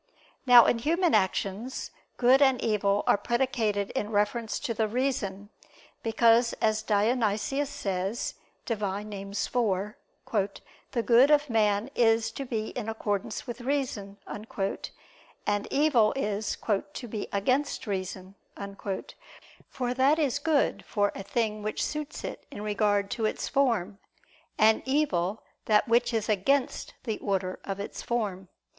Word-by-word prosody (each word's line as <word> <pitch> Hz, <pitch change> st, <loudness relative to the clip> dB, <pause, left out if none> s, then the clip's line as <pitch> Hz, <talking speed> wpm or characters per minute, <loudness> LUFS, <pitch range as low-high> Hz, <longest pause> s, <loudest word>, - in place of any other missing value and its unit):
Now 245 Hz, -2 st, +9 dB
in 230 Hz, -, +2 dB
human 335 Hz, +7 st, +2 dB
actions, 200 Hz, +4 st, 0 dB, 0.3 s
good 255 Hz, +3 st, +5 dB
and 265 Hz, -3 st, +5 dB
evil 205 Hz, -2 st, +1 dB
are -, -, +4 dB
predicated 225 Hz, -4 st, 0 dB
in 210 Hz, -, -2 dB
reference 220 Hz, +2 st, 0 dB
to 230 Hz, -, -2 dB
the 220 Hz, 0 st, 0 dB
reason; 210 Hz, -5 st, -2 dB, 0.5 s
because 230 Hz, +1 st, +4 dB
as 215 Hz, -1 st, +1 dB
Dionysius 220 Hz, +5 st, +1 dB
says 195 Hz, -5 st, -2 dB, 0.3 s
(Div. 225 Hz, -3 st, -2 dB
Nom. 205 Hz, +1 st, -3 dB, 0.2 s
iv), 205 Hz, -1 st, -2 dB, 0.4 s
"the 235 Hz, -3 st, 0 dB
good 245 Hz, +4 st, +6 dB
of 295 Hz, -1 st, +4 dB
man 215 Hz, +2 st, +2 dB
is 225 Hz, -2 st, +3 dB
to 275 Hz, +4 st, -5 dB
be 220 Hz, -3 st, -3 dB
in 225 Hz, -3 st, -5 dB
accordance 205 Hz, -3 st, -3 dB
with 240 Hz, 0 st, -6 dB
reason," 245 Hz, -7 st, -2 dB
and 205 Hz, -, -5 dB
evil 275 Hz, -7 st, +3 dB
is 210 Hz, -5 st, -2 dB, 0.4 s
"to 245 Hz, -, -6 dB
be 210 Hz, -2 st, -4 dB
against 255 Hz, +10 st, 0 dB
reason." 190 Hz, -2 st, -4 dB, 1.4 s
For 250 Hz, -2 st, -2 dB
that 270 Hz, +4 st, +3 dB
is 285 Hz, -4 st, +1 dB
good 305 Hz, -1 st, +1 dB
for 205 Hz, -2 st, 0 dB
a -, -, -6 dB
thing 215 Hz, +1 st, -1 dB
which 215 Hz, 0 st, -2 dB
suits 300 Hz, 0 st, -5 dB
it -, -, -7 dB
in 210 Hz, -7 st, -7 dB
regard 205 Hz, -1 st, +1 dB
to 230 Hz, -3 st, -1 dB
its 215 Hz, -, -1 dB
form; 215 Hz, -8 st, +1 dB, 0.6 s
and 220 Hz, +1 st, +5 dB
evil, 220 Hz, -, 0 dB, 0.2 s
that 215 Hz, +4 st, +3 dB
which 240 Hz, +1 st, +3 dB
is 225 Hz, -2 st, -1 dB
against 250 Hz, +7 st, 0 dB
the 220 Hz, -4 st, -3 dB
order 190 Hz, -2 st, -2 dB
of 195 Hz, 0 st, -4 dB
its 200 Hz, -, -6 dB
form. 200 Hz, -6 st, -2 dB
220 Hz, 135 wpm, -28 LUFS, 205-250 Hz, 1.4 s, Now